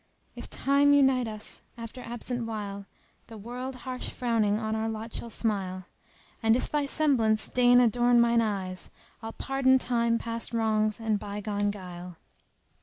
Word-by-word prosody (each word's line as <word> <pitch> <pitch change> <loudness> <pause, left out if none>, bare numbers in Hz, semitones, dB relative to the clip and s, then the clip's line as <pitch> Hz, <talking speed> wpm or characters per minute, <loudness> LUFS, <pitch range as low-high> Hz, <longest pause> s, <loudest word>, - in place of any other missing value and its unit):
— - - -40
"If - - -9
Time 285 +1 +3
unite 265 -3 +4
us 215 -1 -7 0.2
after 230 +2 -8
absent 240 0 -4
while, 200 -3 -5 0.2
* - - -38
The 225 - -10
world 250 +5 -6
harsh 255 -1 -3
frowning 225 -4 +1
on 220 0 -2
our 220 0 -1
lot 220 +1 -6
shall 235 - -5
smile 195 -5 -2 0.6
And 225 0 +4
if 255 - -2
thy 295 -1 0
semblance 240 -8 +2
deign 245 0 +5
adorn 240 0 +4
mine 235 0 +4
eyes,[FN#293] 190 -4 -4
* - - -32
I'll 225 0 -6
pardon 270 -1 +2
Time 235 -2 +1
past 230 0 -4
wrongs 215 -1 +1
and 220 -2 0
by 205 0 -5
gone 205 0 -1
guile." 180 -3 -8
225 Hz, 170 wpm, -28 LUFS, 210-245 Hz, 0.6 s, deign